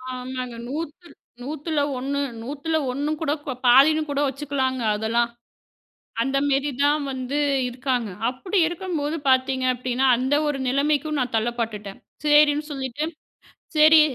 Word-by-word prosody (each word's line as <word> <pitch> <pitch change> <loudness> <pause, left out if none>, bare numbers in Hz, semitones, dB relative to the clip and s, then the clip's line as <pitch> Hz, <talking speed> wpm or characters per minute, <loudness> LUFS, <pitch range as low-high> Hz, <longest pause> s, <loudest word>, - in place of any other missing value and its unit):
ஆமாங்க. 255 -1 -5
நூத்துல் 320 +4 -6 0.3
நூத்துல 305 +2 -3 0.2
ஒண்ணு 275 +3 -2 0.2
நூத்துல 290 +6 -3 0.2
ஒண்ணு 285 +3 -2
கூட 295 -3 0
கோ 270 - -2
பாதின்னு 280 +6 +6
கூட 285 0 -1
வச்சுக்கலாங்க 265 -2 -2
அதெல்லாம். 230 +2 +1 0.9
அந்த 270 +3 0
மாரி 275 +1 +1
தான் 295 +1 +3
வந்து 260 +2 -3 0.3
இருக்காங்க. 250 -2 -2 0.2
அப்டி 365 +10 -1
இருக்கும்போது 330 -4 -3
பாத்தீங்க 260 0 +2
அப்டின்னா, 255 +1 -1
அந்த 260 +3 +1
ஒரு 290 -2 -1
நிலைமைக்கும் 290 +3 +1
நான் 250 -2 -2
தள்ளப்பட்டுட்டன். 220 -3 -3 0.3
சரின்னு 295 0 +4
சொல்லிட்டு 270 +1 -3 0.7
சரி 310 +1 +8
275 Hz, 125 wpm, -23 LUFS, 255-295 Hz, 0.9 s, சரி